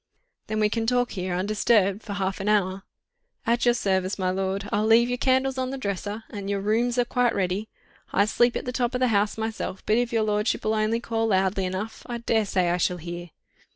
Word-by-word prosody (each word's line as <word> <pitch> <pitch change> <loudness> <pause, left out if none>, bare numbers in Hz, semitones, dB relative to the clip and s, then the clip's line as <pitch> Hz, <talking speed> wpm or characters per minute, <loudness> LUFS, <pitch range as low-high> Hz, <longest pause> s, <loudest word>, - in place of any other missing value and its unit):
"Then 215 0 -2
we 215 - +4
can 225 +1 -2
talk 245 0 +2
here 185 -2 -3
undisturbed 205 +1 +2
for 205 - -6
half 195 -1 -2
an 195 +2 -1
hour?" 195 -2 +1 0.6
"At 235 +1 +2
your 240 0 +4
service, 190 -4 0
my 185 -2 0
lord.... 195 +1 -2
I'll 210 +1 +1
leave 235 +2 +5
your 245 0 -2
candles 260 0 +2
on 255 0 -1
the 270 - -4
dresser... 205 -1 -4
and 200 -2 -5
your 200 -1 0
rooms 230 +5 +1
are 245 - +3
quite 245 -1 +1
ready... 195 +3 -1 0.4
I 200 - +3
sleep 240 +3 +2
at - - -3
the 250 - -2
top 245 -1 -1
of - - 0
the 255 -1 +3
house 205 0 +1
myself, 220 -3 -4
but 215 - +3
if 245 -1 0
your 225 -2 +2
lordship'll 210 +1 0
only 220 +2 +1
call 225 -1 -1
loudly 190 -1 +1
enough, 200 +5 -5
I 240 -1 -3
daresay 210 -6 +1
I 175 - +1
shall 180 0 0
hear." 175 +1 -7
215 Hz, 220 wpm, -25 LUFS, 195-235 Hz, 0.6 s, leave